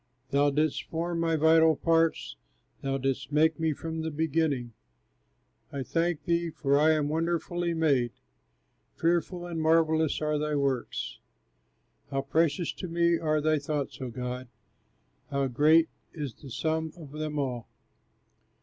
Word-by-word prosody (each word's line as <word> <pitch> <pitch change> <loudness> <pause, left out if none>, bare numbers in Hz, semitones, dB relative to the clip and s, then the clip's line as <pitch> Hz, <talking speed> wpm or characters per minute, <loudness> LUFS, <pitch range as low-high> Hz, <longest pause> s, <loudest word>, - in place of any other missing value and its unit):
Thou 145 +1 +4
didst 150 +1 +1
form 170 +1 -3
my 165 -1 +1
vital 160 +1 +5
parts, 165 +1 +1 0.5
Thou 135 0 -1
didst 135 0 -2
make 155 +2 +3
me 160 -1 +1
from 160 +2 -4
the 160 - -2
beginning, 150 -5 0 1.0
I 140 -1 -3
thank 165 +2 -1
thee, 170 0 +1
for 140 -2 +1
I 155 +1 +5
am 150 -2 +1
wonderfully 170 +2 -1
made; 140 -7 +2 0.8
Fearful 175 +1 0
and 170 -2 -4
marvellous 160 -1 +3
are 150 -1 0
thy 150 0 -1
works. 135 -4 -2 0.9
How 135 0 -1
precious 160 +3 +1
to 185 - -6
me 170 0 +2
are 155 -1 +1
thy 155 0 +2
thoughts, 145 -1 -3
O 130 - -3
God! 125 +1 -5 0.8
How 140 -1 0
great 155 +6 +4 0.3
is 145 -7 -5
the 140 - -13
sum 160 +5 -1
of 155 -5 -11
them 150 0 -4
all! 125 -5 -2
155 Hz, 140 wpm, -28 LUFS, 140-165 Hz, 1.0 s, vital